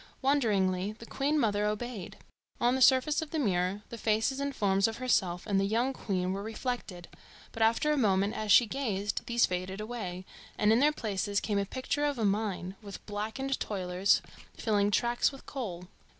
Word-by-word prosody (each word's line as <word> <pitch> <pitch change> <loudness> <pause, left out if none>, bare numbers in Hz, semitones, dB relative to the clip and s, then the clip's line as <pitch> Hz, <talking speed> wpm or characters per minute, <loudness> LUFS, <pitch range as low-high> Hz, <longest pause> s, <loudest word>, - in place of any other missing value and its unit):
Wonderingly, 205 -8 +1
the 230 +2 -12
Queen 285 +5 0
mother 210 -4 +1
obeyed. 210 -2 -4 0.4
On 240 +1 +3
the 265 - -1
surface 265 +4 +5
of 320 - -5
the 320 - -3
mirror 195 -5 0
the 235 - -8
faces 220 +6 +1
and 280 0 -2
forms 195 0 +2
of 225 0 -4
herself 185 -8 0
and 200 -3 +1
the - - +2
young 230 +6 +1
queen 185 -6 -2
were 195 - -3
reflected; 220 -5 -5 0.4
but 225 - -7
after 230 +7 +3
a - - +3
few 280 - +1
moments, 200 -1 +2
as 215 -1 -1
she 240 - +8
gazed, 210 -5 -2
these 235 0 +3
faded 185 +2 -4
away, 210 -5 -5 0.3
and 210 +1 +4
in 230 - +4
their 295 +3 +5
places 205 -6 -1
came 205 -2 -1
a 200 - 0
picture 260 +5 -2
of 290 -2 -1
a 225 - 0
mine, 195 -2 -1
with 200 -2 -10
blackened 220 +6 -3
toilers 185 -1 +1 0.3
filling 205 -3 +1
tracks 240 +5 +2
with 275 - -13
coal. 190 -10 -5
215 Hz, 190 wpm, -30 LUFS, 195-250 Hz, 0.4 s, she